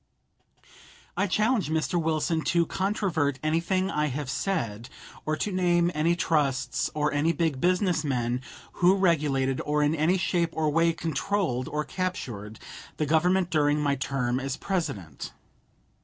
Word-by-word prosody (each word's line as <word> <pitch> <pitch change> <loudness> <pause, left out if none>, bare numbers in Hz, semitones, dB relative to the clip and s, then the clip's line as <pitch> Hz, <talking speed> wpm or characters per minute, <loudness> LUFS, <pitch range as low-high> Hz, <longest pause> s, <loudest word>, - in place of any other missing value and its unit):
I 200 - +1
challenge 215 - +1
Mr. 160 +2 0
Wilson 160 +1 0
to 170 -1 +2
controvert 185 -9 0
anything 170 +5 0
I 150 0 +1
have 140 -1 -3
said, 130 - -2 0.4
or 155 - +1
to 205 - -2
name 175 -2 +2
any 160 +3 +2
trusts 145 -6 0
or 150 -1 0
any 150 +3 +2
big 155 -4 -1
business 180 -2 +2
men 125 -3 -1 0.3
who 180 +2 +4
regulated, 145 -8 +1
or 150 0 +1
in 145 +1 +2
any 165 +4 +2
shape 175 -2 +1
or 155 -1 +1
way 165 +2 +3
controlled, 165 -5 -1
or 150 +1 -2
captured, 115 - -4 0.4
the 155 - 0
Government 175 +4 +2
during 150 -1 +2
my 145 -1 +1
term 130 -2 -1
as 135 0 -3
President. 105 - -4
155 Hz, 140 wpm, -27 LUFS, 140-180 Hz, 0.4 s, who